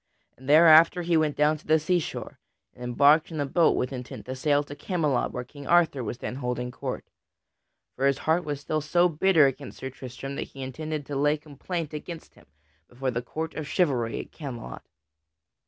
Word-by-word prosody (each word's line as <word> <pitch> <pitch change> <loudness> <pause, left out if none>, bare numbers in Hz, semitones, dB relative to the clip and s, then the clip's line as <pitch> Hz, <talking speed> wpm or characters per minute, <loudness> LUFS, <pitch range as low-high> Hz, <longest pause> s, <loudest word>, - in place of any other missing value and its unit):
And 130 +2 -11
thereafter 165 +3 +7
he 170 0 +1
went 155 -2 +2
down 150 +1 +3
to - - -21
the 155 +1 +5
seashore 170 +2 -2 0.3
and - - -17
embarked 145 +6 +4
in 160 -2 -5
a 145 - 0
boat 165 +4 +3
with 125 +2 -1
intent 125 -1 -7
to 130 - -5
sail 145 +2 +2
to 145 0 -9
Camelot 155 -6 -1
where 125 - -4
King 140 +2 -12
Arthur 165 -6 +3
was 120 +2 -4
then 125 - -5
holding 125 -1 -3
court. - - -5 0.9
For 135 +1 +1
his 140 - +2
heart 165 +3 +2
was 145 -2 -4
still 155 +1 -1
so 175 +4 +3
bitter 165 -1 +4
against 135 0 -3
Sir 130 - -6
Tristram 130 +2 -7
that - - -4
he 135 - -9
intended 155 +3 -5
to 145 - -5
lay 145 +2 +2
complaint 155 +2 -6
against 160 +2 -8
him - - -21 0.4
before 130 +1 -3
the 120 0 -2
court 160 +6 -5
of 155 -2 -5
chivalry 130 -12 0
at - - -8
Camelot. 120 - -7
145 Hz, 195 wpm, -26 LUFS, 130-160 Hz, 0.9 s, thereafter